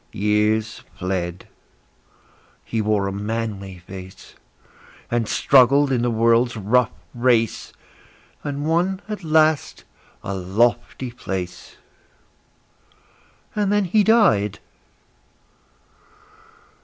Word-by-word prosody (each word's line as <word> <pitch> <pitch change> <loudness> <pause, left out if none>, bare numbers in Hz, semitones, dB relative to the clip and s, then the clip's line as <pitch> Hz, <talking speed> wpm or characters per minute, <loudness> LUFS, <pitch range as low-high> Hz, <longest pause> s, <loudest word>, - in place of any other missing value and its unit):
Years 105 +2 0 0.2
fled; 90 -1 -3 1.2
he 115 - -2
wore 105 -2 +1
a 100 - -2
manly 100 -2 -4
face, 95 +1 -11 0.8
And 120 -2 0
struggled 140 +3 +4
in 125 -3 +1
the 120 - +1
world's 115 +1 +2
rough 115 +4 +2 0.2
race, 120 -2 +1 0.7
And 145 0 -4
won 180 +4 0
at 210 -3 -6
last 155 -1 +2 0.4
a 100 - -4
lofty 115 +6 0
place. 90 -6 -6 1.8
And 205 -2 0
then 205 -1 +2
he 210 +4 +3
died! 195 - +3
115 Hz, 90 wpm, -22 LUFS, 100-140 Hz, 1.8 s, struggled